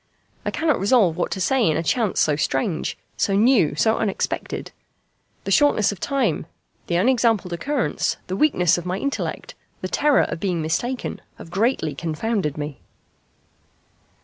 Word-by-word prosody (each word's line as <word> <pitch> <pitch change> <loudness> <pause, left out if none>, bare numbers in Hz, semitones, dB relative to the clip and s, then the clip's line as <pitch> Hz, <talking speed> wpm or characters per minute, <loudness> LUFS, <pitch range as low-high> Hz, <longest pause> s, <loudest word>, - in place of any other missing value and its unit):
I - - -1
cannot 320 -2 +1
resolve 200 -4 +3
what 180 - -1
to - - -5
say 250 +7 +2
in 155 - +1
a - - -1
chance 220 +2 0
so 150 - +3
strange, 150 +3 -1 0.2
so 195 - +1
new, 210 - +4
so 220 +8 +2
unexpected. 210 -3 -2 0.7
The - - -4
shortness 290 -10 +4
of 200 - -8
time, 275 +4 0 0.4
the 170 - 0
unexampled 225 -2 +2
occurrence, 270 +8 -1
the 185 - -4
weakness 180 - +3
of 175 - -9
my 180 +1 -1
intellect, 280 +6 -3 0.3
the - - -2
terror 295 -1 +3
of - - -4
being 180 -2 -1
mistaken, 205 +11 -2 0.2
have 165 - -11
greatly 195 - 0
confounded 165 +1 -2
me." 145 -1 -5
195 Hz, 150 wpm, -22 LUFS, 165-245 Hz, 0.7 s, new